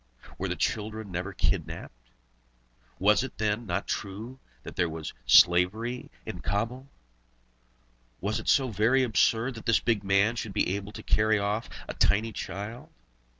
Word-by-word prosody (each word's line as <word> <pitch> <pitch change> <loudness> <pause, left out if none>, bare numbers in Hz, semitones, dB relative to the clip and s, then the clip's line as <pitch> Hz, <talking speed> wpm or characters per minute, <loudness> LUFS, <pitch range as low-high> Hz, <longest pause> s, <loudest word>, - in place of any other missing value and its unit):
Were - - -1
children 110 -1 -2
never 90 +3 -3
kidnapped? - - -3 0.9
Was 105 +5 +4
it, 130 - -7
then, 105 +1 -1
not 85 - -1
true 110 +7 -5 0.2
that - - -9
there 85 - +1
was 80 -1 -6
slavery 105 +8 +4 0.2
in - - -6
Cabul? 115 +7 -2 1.3
Was 105 +2 -1
it - - -9
so 135 -2 +4
very 115 +5 +3
absurd 115 +3 +2
that 115 - -9
this 115 - +4
big 110 -4 0
man 100 +4 +3
should 110 -4 -4
be 95 - +1
able 100 0 -6
to - - -8
carry 110 0 +3
off 105 +2 -1 0.2
a - - -4
tiny 110 +3 +2
child? 105 +5 -6
105 Hz, 150 wpm, -28 LUFS, 100-115 Hz, 1.3 s, Was